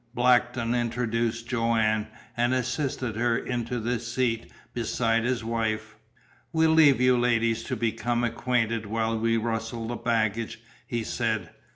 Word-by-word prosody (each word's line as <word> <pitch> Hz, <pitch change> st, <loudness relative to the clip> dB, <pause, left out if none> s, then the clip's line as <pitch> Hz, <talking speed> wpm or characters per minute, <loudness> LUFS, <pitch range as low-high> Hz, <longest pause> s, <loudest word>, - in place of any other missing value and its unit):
Blackton 120 Hz, -1 st, +3 dB
introduced 115 Hz, -1 st, -1 dB
Joanne, 115 Hz, -3 st, +1 dB, 0.3 s
and 120 Hz, +2 st, +2 dB
assisted 130 Hz, -2 st, -2 dB
her 120 Hz, 0 st, +2 dB
into 120 Hz, -1 st, -3 dB
the 120 Hz, +1 st, -1 dB
seat 120 Hz, 0 st, -2 dB, 0.2 s
beside 115 Hz, -1 st, 0 dB
his 125 Hz, -2 st, 0 dB
wife. 110 Hz, -1 st, -2 dB, 0.6 s
"We'll 160 Hz, 0 st, +3 dB
leave 155 Hz, -5 st, +6 dB
you 125 Hz, 0 st, +5 dB
ladies 115 Hz, -1 st, +2 dB
to -, -, -2 dB
become 120 Hz, +1 st, -1 dB
acquainted 115 Hz, -2 st, 0 dB
while 110 Hz, +1 st, -1 dB
we 115 Hz, 0 st, +2 dB
rustle 115 Hz, 0 st, -3 dB
the 120 Hz, -, -3 dB
baggage," 115 Hz, -2 st, -1 dB, 0.3 s
he 120 Hz, -2 st, -2 dB
said. 110 Hz, -6 st, -2 dB
115 Hz, 135 wpm, -27 LUFS, 115-120 Hz, 0.6 s, leave